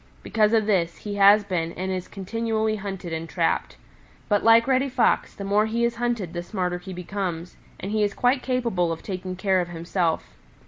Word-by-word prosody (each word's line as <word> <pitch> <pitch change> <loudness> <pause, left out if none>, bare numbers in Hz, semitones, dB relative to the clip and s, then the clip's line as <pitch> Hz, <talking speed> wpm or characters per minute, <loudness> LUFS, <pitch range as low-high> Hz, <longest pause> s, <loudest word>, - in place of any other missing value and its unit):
Because 215 -1 +2
of 220 -2 +3
this, 175 -5 +1
he 205 -1 -6
has 200 +1 +7
been 170 -4 -2
and 190 +1 -3
is 185 -1 -3
continually 220 +2 -2
hunted 190 -4 -6
and 160 0 -4
trapped. - - -1 0.5
But 205 -1 +2
like 230 0 +6
Reddy 265 +1 +2
Fox 250 -2 +1
the 200 - -7
more 205 +2 +2
he 230 +2 -1
is 235 0 -2
hunted 235 -8 -2
the 175 - -3
smarter 180 -1 -3
he 190 +2 -9
becomes, 180 -1 -4 0.2
and 195 - -5
he 215 0 +1
is 205 -1 0
quite 250 +2 +2
capable 235 -10 0
of 165 - -5
taking 185 -1 -5
care 190 -1 +2
of 175 - -4
himself. 170 0 -2
195 Hz, 195 wpm, -24 LUFS, 180-220 Hz, 0.5 s, has